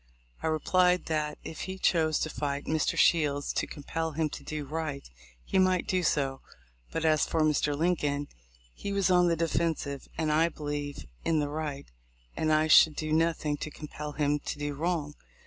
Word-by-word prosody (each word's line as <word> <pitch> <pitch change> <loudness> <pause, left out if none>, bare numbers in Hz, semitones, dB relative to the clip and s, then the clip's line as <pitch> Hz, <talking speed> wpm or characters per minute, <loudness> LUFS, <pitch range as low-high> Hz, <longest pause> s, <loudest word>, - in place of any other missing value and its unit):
I - - -1
replied, 180 +3 +2
that, 150 -1 -1
if 160 - -7
he 190 +1 -5
chose 160 -4 +2
to 155 - -1
fight 140 -1 -3
Mr. 155 -1 0
Shields 145 -4 +3
to - - -1
compel 160 +2 -4
him 155 0 0
to - - -8
do 155 -1 -4
right, 150 -1 -4 0.4
he - - +1
might 185 -1 +3
do 185 -1 +1
so; 135 -5 0 0.5
but 165 - -2
as 155 -2 +3
for 160 - 0
Mr. 150 -1 +2
Lincoln, 145 -4 0 0.5
he 200 - -5
was 195 -2 +2
on 180 -1 +5
the 170 - +2
defensive, 160 -3 -1
and, 155 -2 0
I 160 +2 +3
believe, 145 - -5 0.2
in 160 -1 +2
the 145 -1 -1
right, 145 -2 -4 0.5
and 155 - 0
I 155 0 +4
should 155 -1 +7
do 155 0 -2
nothing 160 -2 +1
to 155 - -5
compel 150 0 -7
him 150 0 +1
to 145 - -5
do 145 0 -3
wrong. 155 -1 -2
155 Hz, 180 wpm, -29 LUFS, 145-165 Hz, 0.5 s, should